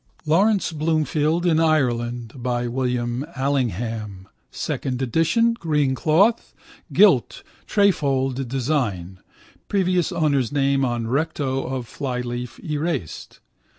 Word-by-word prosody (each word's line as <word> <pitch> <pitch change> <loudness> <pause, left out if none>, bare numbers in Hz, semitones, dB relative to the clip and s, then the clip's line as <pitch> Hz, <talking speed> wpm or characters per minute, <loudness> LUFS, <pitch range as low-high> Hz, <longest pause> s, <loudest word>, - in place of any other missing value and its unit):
Laurence 195 +6 +2
Bloomfield 155 +1 0
in 165 -2 +3
Ireland 120 -7 0
by 120 -1 -2
William 125 0 -1
Allingham 115 -7 -2 0.2
(second 125 -2 -3
edition, 165 - +2
green 150 -9 0
cloth, 185 - +2 0.4
gilt - - +4 0.2
trefoil 140 -10 +2
design, 125 - -2 0.5
previous 185 -3 +1
owner's 140 -6 +1
name 140 -1 +1
on 120 -2 -1
recto 135 0 -1
of 130 -2 -4
flyleaf 125 -3 -4
erased). 150 - -4
135 Hz, 95 wpm, -22 LUFS, 120-155 Hz, 0.5 s, gilt